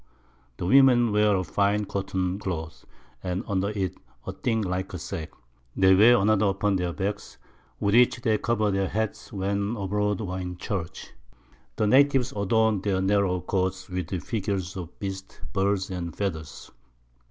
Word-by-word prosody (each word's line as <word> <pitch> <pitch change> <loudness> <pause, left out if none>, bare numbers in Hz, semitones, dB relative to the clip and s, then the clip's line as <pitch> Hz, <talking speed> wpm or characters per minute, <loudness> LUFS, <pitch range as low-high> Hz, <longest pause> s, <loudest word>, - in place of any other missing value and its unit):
The - - -4
Women 120 +1 +5
wear 105 0 +3
a 95 - 0
fine 100 +4 +1
white 105 - -5
Cotton 95 -1 -2
Cloth, 85 -5 -5 0.4
and 90 0 -3
under 100 0 0
it 95 -3 -3 0.3
a - - -3
thing 115 -3 -1
like 95 0 -3
a - - -3
Sack; 80 -1 -6 0.5
they 95 0 +5
wear 115 +6 +7
another 105 0 +3
upon 100 +1 +1
their 90 -1 -1
Backs, 100 +3 -4 0.4
with 100 - +1
which 120 +1 +5
they 110 -3 +2
cover 110 -3 +1
their 95 0 0
Heads 110 0 -3
when 100 +2 -1
abroad 105 0 -1
or 95 -2 -4
in 90 -1 -5
Church. 90 -4 -5 0.6
The 110 - +1
Natives 135 +2 +4
adorn 110 0 +2
their 100 -2 0
narrow 95 -1 +1
Coats 95 +1 -2
with 90 -2 -3
Figures 100 -5 -3
of 90 -3 -8
Beasts, 95 -1 -6
Birds 95 -1 0
and 85 -3 -5
Feathers. 80 -6 -5
100 Hz, 160 wpm, -26 LUFS, 95-105 Hz, 0.6 s, wear